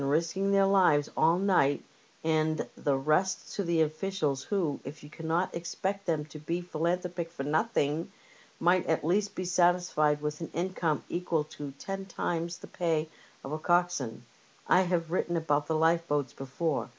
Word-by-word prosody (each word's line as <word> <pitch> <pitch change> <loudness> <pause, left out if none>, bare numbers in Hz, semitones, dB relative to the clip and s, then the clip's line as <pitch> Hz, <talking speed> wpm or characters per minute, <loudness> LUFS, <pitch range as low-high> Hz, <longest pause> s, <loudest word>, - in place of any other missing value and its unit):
173 160 +7 0
risking 195 0 +2
their 195 0 +5
lives 180 -7 +4
all 165 +2 +4
night, 180 -8 +3 0.4
and 155 -1 +1
the 140 -2 +1
rest 155 +7 0
to 170 -5 +2
officials 155 -3 -2
who^ 175 -8 0
if 145 +3 -9
you 145 - -12
cannot 165 +3 -1
expect 190 +3 -3
them 155 -3 0
to 155 0 -10
be 165 +4 -2
philanthropic 175 0 -2
for 165 -5 -6
nothing, 155 -1 0 0.5
might 175 +1 +4
at 160 -2 +1
least 200 +4 +1
be 185 - -3
satisfied 175 -4 +3
with 150 +1 -4
an 165 - -4
income 170 -3 0
equal 170 -3 0
to 145 -1 -8
ten 195 +4 -5
times 170 -2 -2
the - - -11
pay 160 -3 -1 0.4
of 135 - -6
a 155 - -2
coxswain. 175 -9 0 0.4
I 180 - +6
have 175 -3 0
written 175 -1 0
about 145 -2 +1
the 160 - 0
lifeboats 160 -4 +2
before. 135 +2 -2
165 Hz, 160 wpm, -30 LUFS, 150-180 Hz, 0.5 s, I